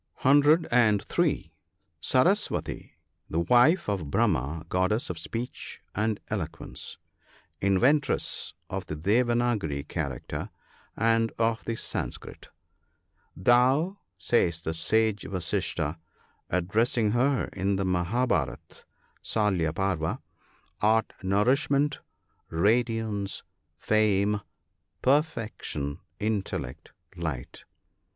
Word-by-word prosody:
(103.) 140 - +3 0.5
Saraswati. 185 - +1 0.2
— - - -47
The 80 - 0
wife 125 - +4
of 95 -8 -2
Brahma, 70 +4 0
goddess 95 +5 0
of 85 - -7
speech 115 +8 -5
and 110 +1 0
elo - - -1
quence - - -9 0.3
— - - -32
inventress 135 +9 +2
of 95 -2 -5
the 80 - -4
Devanagari 105 - +1
character 70 -7 -4 0.5
and 115 +1 +2
of 115 0 +1
the 115 - -2
Sanskrit. - - -5 0.5
" - - -43
Thou," 130 - +3 0.2
says 85 -8 +1
the 80 - -2
Sage 110 +5 +1
Vasistha, 85 -3 -2 0.5
addressing 105 +5 +1
her 130 +3 +2
in 100 +1 0
the 95 0 -1
Mahab 95 +8 +1
karat - - -2 0.4
(Salya 95 -7 +1
Parva), 85 -2 -1 0.6
"art 110 +2 +3
nourishment, 135 +9 +2 0.5
radiance, 110 +1 0 0.3
fame, 105 -1 +2 0.6
perfection, 115 - 0 0.2
intel 105 -2 -1
lect, 65 +5 -9 0.3
light. 80 -8 -5
105 Hz, 95 wpm, -27 LUFS, 90-120 Hz, 0.6 s, wife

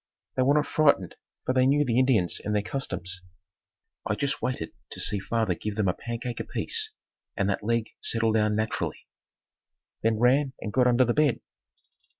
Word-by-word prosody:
They - - +1
were 140 +3 +4
not 150 - +3
frightened 140 - +2 0.3
for 130 - +1
they 130 0 +4
knew 145 +2 +3
the 120 -1 +2
Indians 120 -9 +2
and 105 - -1
their 105 - +1
customs. 95 -8 -4 0.8
I 110 - -1
just 140 +5 -1
waited 125 -11 -2 0.2
to - - -7
see 105 - 0
father 110 -1 0
give 105 +4 -5
them 105 -2 +1
a 90 - +2
pancake 120 +2 -5
apiece - - -1 0.5
and 100 - +1
that 100 - -3
leg 115 0 0
settle 115 -1 +1
down 105 -1 +2
naturally, 110 +1 -2 1.0
then 110 0 +2
ran 130 +4 +3
and 105 - -5
got 125 -1 +4
under 125 +1 +4
the 120 - +1
bed. 150 -3 +2
115 Hz, 175 wpm, -27 LUFS, 105-130 Hz, 1.0 s, were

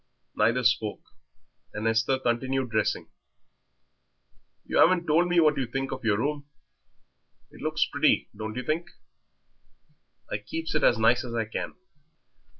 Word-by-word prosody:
Neither 115 +4 +2
spoke, 110 -3 +1 0.7
and 110 +1 -2
Esther 115 +4 +2
continued 130 0 -1
dressing. 110 -2 0 1.6
"You - - 0
'aven't 175 0 +5
told 165 +3 +3
me 175 -1 +3
what 155 -2 +4
you 130 -2 -1
think 135 +2 -3
of 130 0 -6
your 105 -2 +2
room. 145 +4 -3 1.0
It - - -14
looks - - +1
pretty, - - +2
don't 110 +1 -6
you 125 - -3
think? 160 +4 -2 1.4
I 105 - -1
keeps 160 +10 -5
it 155 - 0
as - - +5
nice 110 +2 +3
as 120 -2 -6
I 115 -1 0
can. 110 - -5
125 Hz, 145 wpm, -27 LUFS, 110-150 Hz, 1.6 s, aven't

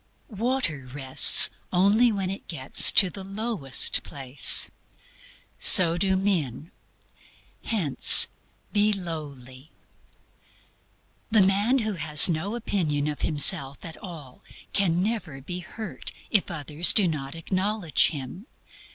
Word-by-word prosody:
Water 210 - -4
rests 135 -1 +5 0.2
only 205 +6 +1
when 195 -3 -5
it 195 - -11
gets 135 -5 +3
to 190 -3 +3
the 195 - -11
lowest 195 - -1
place. 135 -1 +1 0.9
So 170 -2 +5
do 190 +2 -2
men. 175 - -4 0.9
Hence, 175 - +5 0.5
be 210 +1 +1
lowly. 145 -7 -10 1.6
The 215 -3 +2
man 205 +7 0
who 215 - -4
has 150 -1 +5
no 180 +6 -4
opinion 155 -10 -3
of 150 -1 -7
himself 140 -2 0
at 165 - -10
all 155 -9 -13 0.3
can 180 -3 -1
never 195 -10 -6
be 175 +7 -8
hurt 215 +4 -9 0.2
if 205 - +1
others 155 +2 +1
do 205 -4 +2
not 140 -3 -6
acknowledge 185 +1 -1
him. 160 - -9
175 Hz, 115 wpm, -23 LUFS, 145-200 Hz, 1.6 s, rests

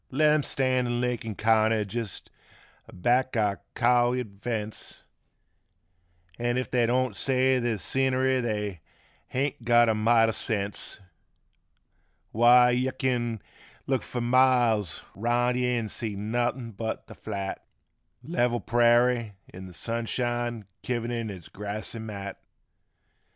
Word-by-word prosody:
Let 150 +3 +3
'em. 155 - +3
stand 130 -2 +1
in 120 0 -1
Lincoln 120 -3 -2
county 110 0 +2
jest 110 -1 -5 0.6
aback 125 +6 0
our 105 -3 0
cowyard 120 -4 +1
fence, 110 -3 -5 1.4
An' 120 +1 0
if 130 - -3
they 120 -2 +2
don't 130 +1 +1
say 130 -1 +2
there's 120 -5 -1
scenery 130 0 +1
they 105 -7 -3 0.5
haint 135 -1 -2
got 120 0 +5
a - - +3
mite 115 +1 +4
o' - - +1
sense; 105 -3 -2 1.3
Why 125 +2 +6
yuh 130 +1 0
kin 120 -4 -1 0.4
look 130 -2 0
fur 120 - -5
miles 120 -6 +3
around 120 +4 +1
yuh 125 0 +1
an' 120 -3 0
see 110 -1 -3
nothin' 120 +3 -2
but 110 +2 -5
th' - - -12
flat 100 -3 -5 0.6
Level 125 -7 0
prairie 120 -2 +3
in 95 0 -10
th' 90 - -12
sunshine 120 +1 -2 0.2
kivered 120 -1 -2
in 115 -2 -3
its 95 -5 -8
grassy 105 +3 -5
mat. 100 -3 -7
120 Hz, 125 wpm, -27 LUFS, 110-125 Hz, 1.4 s, Why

